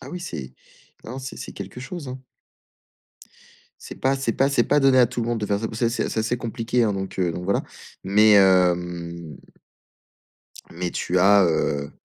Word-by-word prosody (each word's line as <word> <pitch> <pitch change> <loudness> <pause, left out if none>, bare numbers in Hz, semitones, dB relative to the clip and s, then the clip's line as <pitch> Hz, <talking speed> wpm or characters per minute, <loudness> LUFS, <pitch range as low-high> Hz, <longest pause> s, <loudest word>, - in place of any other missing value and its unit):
Ah - - -10
oui 180 - -6
c'est 70 - -7 0.5
non 125 +4 -7
c'est 135 0 -7
c'est - - -8
quelque 125 - -8
chose, 145 0 -7
hein. 130 +1 -8 1.6
C'est - - -9
pas 135 +1 +1
c'est 135 -4 -1
pas 135 - +2
c'est 140 - +2
pas 145 - +2
donné 135 -2 +4
à 120 - +6
tout 125 -1 -4
le - - -3
monde 120 -2 -1
de 105 - -2
faire 100 0 0
ça. 110 - -3
Pa 110 - -8
ça 115 +1 +1
c'est 120 - -1
assez - - -2
c'est - - -3
assez 115 +3 -1
compliqué 120 +1 -1
hein 105 - +1
donc 95 -1 -5
heu, 90 -2 +1
donc 90 - -6
voilà, 100 - 0 0.4
mais 105 +2 +5
hem, 90 -4 +2 1.4
mais 90 0 -3
tu 90 +1 -1
as, 100 +1 +6
heu 70 -3 0
105 Hz, 205 wpm, -23 LUFS, 90-125 Hz, 1.6 s, à